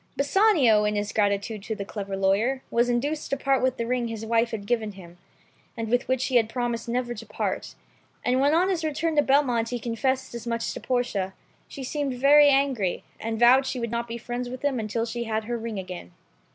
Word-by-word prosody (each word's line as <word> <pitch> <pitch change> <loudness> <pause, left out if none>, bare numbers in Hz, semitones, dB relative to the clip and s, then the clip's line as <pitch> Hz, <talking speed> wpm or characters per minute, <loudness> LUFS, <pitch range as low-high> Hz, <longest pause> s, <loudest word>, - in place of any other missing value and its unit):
Bassanio, 280 - +4
in 210 0 0
his 205 0 -2
gratitude 205 0 0
to 220 +2 -4
the 200 -2 -5
clever 200 -2 -5
lawyer, 210 +8 +1
was 240 +1 +2
induced 285 +6 -1
to 275 - 0
part 275 -1 +1
with 255 0 +1
the 230 - -2
ring 245 0 -1
his 225 -1 -5
wife 230 +1 +1
gave 235 +2 +1
him, 175 -2 -13 0.6
and 225 -1 -3
when 245 0 +3 2.5
on 360 +3 +3
his 350 -4 -1
return 315 +1 -1
to 295 - +5
Belmont, 265 -5 +2
he 245 - -2
confessed 240 +3 -2
as 235 0 -7
much 230 0 -2
to - - -6
Portia, 240 -7 -1 0.3
she 275 - -8
seemed 275 0 -2
very 285 +3 +6
angry, 270 -9 +1 0.2
and 225 0 -3
vowed 255 +3 +6
she 255 - -3
would 235 -1 -3
not 235 0 -2
be 230 0 -5
friends 245 +1 -4
with 255 +1 -8
him 270 -4 +1
until 225 +1 -2
she 235 +1 -4
had 220 -1 -1
her 240 +2 -3
ring 230 -2 -4
again. 180 - -7
235 Hz, 185 wpm, -26 LUFS, 220-265 Hz, 2.5 s, very